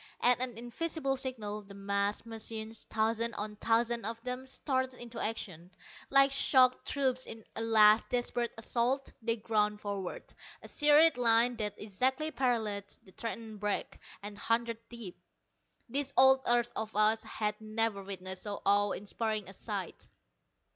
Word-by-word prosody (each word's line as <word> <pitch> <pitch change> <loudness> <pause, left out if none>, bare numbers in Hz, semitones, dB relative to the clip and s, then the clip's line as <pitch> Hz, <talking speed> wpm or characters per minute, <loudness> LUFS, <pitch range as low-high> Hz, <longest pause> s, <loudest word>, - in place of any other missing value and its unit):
At 245 0 +4
an 250 -3 -2
invisible 270 +4 -2
signal, 225 -6 -4
the 200 -1 -13
massed 200 +2 -1
machines 225 0 -6
thousands 225 +1 0
on 210 0 -4
thousands 230 0 +1
of 230 0 -4
them 250 +1 -4
started 260 -1 -1
into 235 -1 -8
action. 180 -6 -4 0.4
Like 275 0 +5
shock 255 -2 +4
troops 260 -3 0
in 225 -1 -9
a - - -3
last 220 -1 +5
desperate 240 -1 -1
assault 245 +4 -1
they 230 0 0
ground 210 -1 0
forward, 200 -3 -5 0.3
a - - -9
serried 295 0 +5
line 235 0 +4
that 210 -2 -1
exactly 260 +9 0
paralleled 220 -6 -1
the 190 - -18
threatened 225 0 -6
break, 205 0 -2 0.2
and 205 0 -7
hundreds 230 +1 -1
deep. 230 -7 -9 0.7
This 280 +3 -2
old 265 0 +7
earth 240 0 +2
of 220 -1 -4
ours 215 +1 +4
had 210 0 -3
never 215 -1 -1
witnessed 190 -1 -5
so 205 -1 -4
awe 205 0 +4
inspiring 215 0 -3
a 195 - -9
sight. - - -5
225 Hz, 145 wpm, -32 LUFS, 210-250 Hz, 0.7 s, old